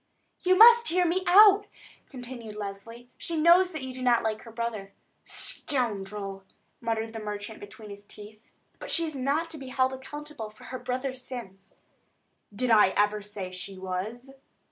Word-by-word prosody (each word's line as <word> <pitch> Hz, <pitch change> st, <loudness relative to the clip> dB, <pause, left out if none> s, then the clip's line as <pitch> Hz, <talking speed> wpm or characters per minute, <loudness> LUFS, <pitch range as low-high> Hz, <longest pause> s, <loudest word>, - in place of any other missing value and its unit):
"You 370 Hz, 0 st, +3 dB
must 470 Hz, +2 st, +8 dB
hear 360 Hz, +1 st, +2 dB
me 360 Hz, +2 st, 0 dB
out," 410 Hz, +2 st, +7 dB, 0.4 s
continued 245 Hz, -4 st, -9 dB
Leslie. 215 Hz, +4 st, -8 dB
"She 335 Hz, -, -3 dB
knows 340 Hz, +4 st, +6 dB
also 360 Hz, -, -12 dB
that 310 Hz, -4 st, -5 dB
you 260 Hz, -1 st, -6 dB
do 255 Hz, -, -8 dB
not 245 Hz, -2 st, +3 dB
like 220 Hz, -1 st, -2 dB
her 230 Hz, -, -12 dB
brother." 220 Hz, -4 st, -4 dB, 0.3 s
"Scoundrel!" 205 Hz, -7 st, -3 dB, 0.4 s
muttered 225 Hz, -1 st, -2 dB
the 225 Hz, -, -5 dB
merchant 210 Hz, 0 st, -6 dB
between 205 Hz, +1 st, -11 dB
his 200 Hz, 0 st, -10 dB
teeth. 210 Hz, +1 st, -13 dB, 0.4 s
"But -, -, -8 dB
she 335 Hz, -, +2 dB
is 310 Hz, -, -5 dB
not 285 Hz, +5 st, -1 dB
to 310 Hz, -, -7 dB
be 265 Hz, -, -9 dB
held 260 Hz, 0 st, +1 dB
accountable 280 Hz, -3 st, -7 dB
for 215 Hz, 0 st, -18 dB
her 255 Hz, -, -7 dB
brother's 255 Hz, +1 st, -4 dB
sins." 220 Hz, -7 st, -9 dB, 0.8 s
"Did 235 Hz, +4 st, -1 dB
I 215 Hz, -3 st, +7 dB
ever 210 Hz, 0 st, +2 dB
say 200 Hz, -2 st, -7 dB
she 185 Hz, +1 st, -6 dB
was?" 205 Hz, +8 st, -5 dB
235 Hz, 170 wpm, -27 LUFS, 210-280 Hz, 0.8 s, must